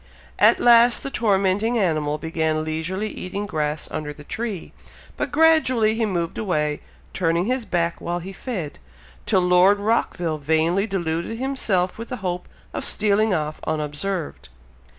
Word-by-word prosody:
At - - +6
last 240 0 +6
the 275 - -4
tormenting 205 +1 +1
animal 155 -7 0
began 160 -1 -1
leisurely 160 +6 -3
eating 200 +2 -5
grass 150 -4 -2
under 155 -1 -4
the 150 0 -11
tree, 215 +1 -5 0.4
but - - -3
gradually 270 -9 +4
he 225 0 0
moved 170 -4 -2
away, 150 -8 -1 0.3
turning 170 0 +1
his 250 +1 -1
back 170 -3 -1
while 175 +1 -2
he 185 +3 -7
fed, 190 - -5 0.5
till 185 - +3
Lord 180 +3 +5
Rockville 175 -7 0
vainly 160 +7 +1
deluded 170 +1 -2
himself 225 -9 -1
with 230 - -7
the 250 - -4
hope 180 0 -3 0.3
of - - -3
stealing 215 +1 +2
off 155 -3 -2
unobserved. 155 - -3
185 Hz, 145 wpm, -23 LUFS, 160-215 Hz, 0.5 s, At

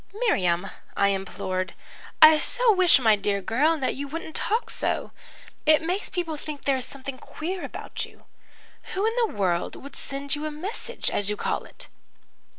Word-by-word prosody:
"'Miriam,' 190 - +1 0.3
I 200 - +4
implored. 185 -1 -3 0.5
'I 310 0 +9
so - - +4
wish 370 -5 +6
my 225 -5 +5
dear 200 0 0
girl, 275 - +2
that 270 - 0
you 280 +1 -5
wouldn't 320 +2 -6
talk 450 +3 0
so. - - -1 0.6
It 310 +1 +6
makes 365 +5 -2
people 335 -4 -3
think 295 -1 -7
there 275 - +3
is 255 - -3
something 275 -1 -7
queer 355 +4 -5
about - - -5
you. - - -11 0.7
Who 390 +3 +1
in 450 - +2
the 470 -2 +3
world 175 -3 0
was 280 - -10
sending 280 +1 -3
you 310 - -2
a - - -2
message, 400 +10 -4
as 205 0 0
you 210 - -1
call - - -2
it?' - - -11
290 Hz, 175 wpm, -26 LUFS, -, 0.7 s, I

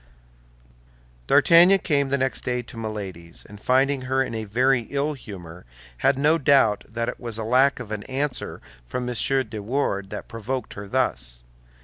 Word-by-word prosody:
D'Artagnan 175 +4 +7
came 140 -6 0
the 140 - +1
next 130 0 -1
day 125 -1 -1
to 120 - -11
Milady's, 100 -7 -6
and 105 0 -13
finding 135 +1 +2
her 130 +1 +1
in 115 - -6
a 110 -1 -3
very 125 +3 +2
ill 145 +2 -1
humor, 90 - -10 0.4
had 135 - +3
no 150 +4 +3
doubt 135 -8 +4
that 115 +1 -3
it - - -4
was 115 -3 -5
lack 125 +5 +3
of 115 -4 -8
an 105 -1 -3
answer 135 +1 -2 0.2
from 125 - -4
M. 125 - -3 0.3
de 110 -1 -6
Wardes 100 -4 -1
that 105 - -7
provoked 115 +2 -4
her 100 0 -8
thus. - - -1
125 Hz, 165 wpm, -24 LUFS, 105-135 Hz, 0.4 s, D'Artagnan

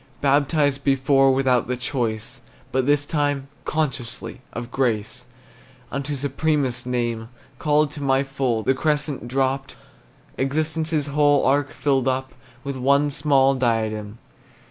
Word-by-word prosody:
Baptized 145 0 +2
before 135 0 +4
without 130 -2 +2
the 125 0 -2
choice, 120 -4 -3 0.3
But 130 0 0
this 145 0 +3
time 145 -2 -1 0.2
consciously, 140 -6 -3
of 120 0 -6
grace 120 -1 -1 0.7
Unto 140 +1 -3
supremest 140 -2 -1
name, 120 -2 -2 0.3
Called 150 -1 +2
to 145 0 -8
my 135 -1 +2
full, 135 -5 -1
the 130 - +3
crescent 145 -2 -1
dropped, 135 +1 -1 0.6
Existence's 155 +2 0
whole 145 0 +3
arc 140 +1 +2
filled 135 -3 0
up 130 0 -1 0.3
With 140 -1 -4
one 140 +3 +3
small 135 -1 +3
diadem. 110 -4 -1
135 Hz, 120 wpm, -23 LUFS, 125-145 Hz, 0.7 s, before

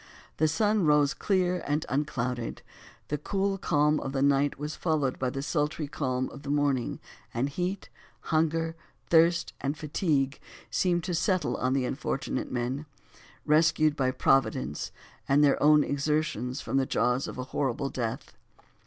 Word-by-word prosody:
The 155 - +3
sun 210 +6 +2
rose 150 -2 +4
clear 180 -3 0
and 150 +2 0
unclouded; 125 -4 -2 0.5
the 150 - -1
cool 195 +4 -1
calm 150 -3 +2
of 135 - -5
the 135 -1 +1
night 140 0 +2
was 150 +2 -4
followed 150 -6 0
by 130 - 0
the 135 +1 -4
sultry 150 0 -1
calm 130 -2 -2
of 140 - -10
the 140 - -7
morning, 145 -4 0 0.4
and 120 +4 +1
heat, 180 +7 -3 0.3
hunger, 165 +1 0 0.4
thirst 170 +1 +4
and 140 +2 -2
fatigue, 145 -3 0 0.3
seemed 175 -2 +1
to 180 0 -3
settle 180 -1 +1
on 130 0 0
the 135 -2 +1
unfortunate 135 0 -3
men, 130 +4 -2 0.6
rescued 155 0 +3
by 130 -2 +1
Providence 130 -2 +1 0.4
and 140 +2 +5
their 140 - +3
own 150 0 +6
exertions 145 -3 -1
from 135 - -1
the 135 -1 +2
jaws 125 +2 +1
of - - -7
a 130 - -3
horrible 135 0 -1
death. 120 +2 -4
145 Hz, 155 wpm, -28 LUFS, 135-160 Hz, 0.6 s, own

